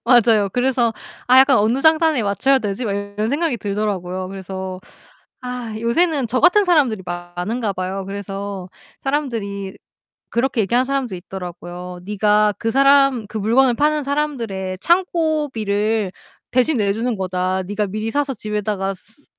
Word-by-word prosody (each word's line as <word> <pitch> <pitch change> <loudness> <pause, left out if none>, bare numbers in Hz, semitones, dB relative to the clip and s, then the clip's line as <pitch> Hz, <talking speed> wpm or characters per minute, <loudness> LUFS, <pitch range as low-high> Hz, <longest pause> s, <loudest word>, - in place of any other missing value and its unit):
맞아요. 230 -4 +5
그래서 245 -2 +1 0.3
'아 255 +1 +6
약간 270 0 +6
어느 225 +6 +2
장단에 315 -4 +4
맞춰야 240 +7 +2
되지?' 210 +1 -3
막 205 - -1
이런 200 +1 -3
생각이 290 -1 0
들더라고요. 195 -3 -3
그래서 190 -1 -6 0.6
아 250 -3 -5
요새는 280 +4 +1
저 255 +3 0
같은 400 +3 +5
사람들이 275 - +2
많은가 175 +6 -3
봐요. 190 +1 -4
그래서 195 -1 -5 0.3
사람들이 225 -9 -3 0.5
그렇게 240 -1 +1
얘기하는 240 +6 +2
사람도 270 -6 -2
있더라고요. 180 0 -8
"네가 210 +1 +2
그 225 - -1
사람, 275 -3 +4
그 215 +1 -5
물건을 240 +4 +3
파는 300 +2 +1
사람들의 235 -11 -2
창고비를 260 - 0 0.4
대신 255 +4 +2
내주는 220 +2 0
거다. 185 0 -1
네가 205 +2 -2
미리 215 +3 -3
사서 285 +1 0
집에다가 210 -3 -2
스 225 +9 -20
220 Hz, 335 characters per minute, -20 LUFS, 195-265 Hz, 0.6 s, 아